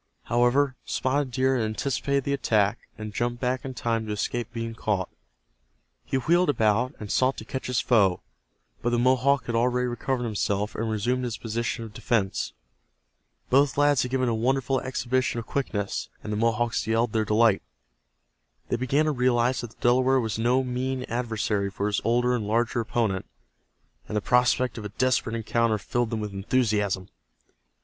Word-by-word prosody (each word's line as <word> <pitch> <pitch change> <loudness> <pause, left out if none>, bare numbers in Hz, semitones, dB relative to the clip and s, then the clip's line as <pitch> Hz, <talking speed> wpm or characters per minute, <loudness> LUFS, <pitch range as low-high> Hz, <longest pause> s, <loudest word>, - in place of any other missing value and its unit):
However, 125 +3 +2
Spotted 135 +1 0
Deer 130 +1 +1
had 115 - 0
anticipated 135 +5 -1
the 140 - -1
attack, 110 -5 +1 0.2
and 110 -1 -6
jumped 120 +2 -1
back 125 +1 -1
in 130 -1 -6
time 115 -1 -1
to - - -3
escape 115 +2 -2
being 115 -1 -4
caught. 105 -5 -1 0.9
He 135 - -1
wheeled 170 +7 +3
about, 115 +1 +2
and 105 -2 -6
sought 130 +1 +2
to 110 - -7
catch 130 +2 -5
his 125 -2 +1
foe, 100 -7 +3 0.6
but 120 - +1
the 120 - +1
Mohawk 130 +3 +3
had 120 - -3
already 125 +2 +2
recovered 125 +1 -2
himself 105 -2 -1
and 115 +1 -2
resumed 120 +4 0
his 120 -2 -3
position 115 0 -3
of 110 - -11
defense. 110 -3 -1 1.0
Both 135 0 +4
lads 145 -2 +4
had 125 - -2
given 130 0 0
a 115 - +1
wonderful 130 +3 +1
exhibition 130 -1 -1
of 115 - -4
quickness, 105 -8 -2
and 105 - -4
the - - -1
Mohawks 115 +1 0
yelled 115 0 +1
their 110 -1 +2
delight. 110 0 +3 1.1
They - - +1
began 135 +5 +1
to 155 - +2
realize 125 -1 +2
that 120 - -6
the 115 - -24
Delaware 130 +2 +4
was 110 -2 -2
no 125 +3 +2
mean 130 +1 -2
adversary 110 -4 -1
for 100 +1 -3
his 105 -1 0
older 120 +2 +2
and 110 -4 -3
larger 115 +2 +1
opponent, 110 -4 -1 0.8
and 105 - -2
the - - 0
prospect 125 +1 +2
of 105 - -7
a - - -4
desperate 120 +1 0
encounter 115 0 +1
filled 120 +3 -1
them 110 -1 -2
with 105 -1 -5
enthusiasm. 100 -3 0
120 Hz, 175 wpm, -26 LUFS, 110-130 Hz, 1.1 s, Both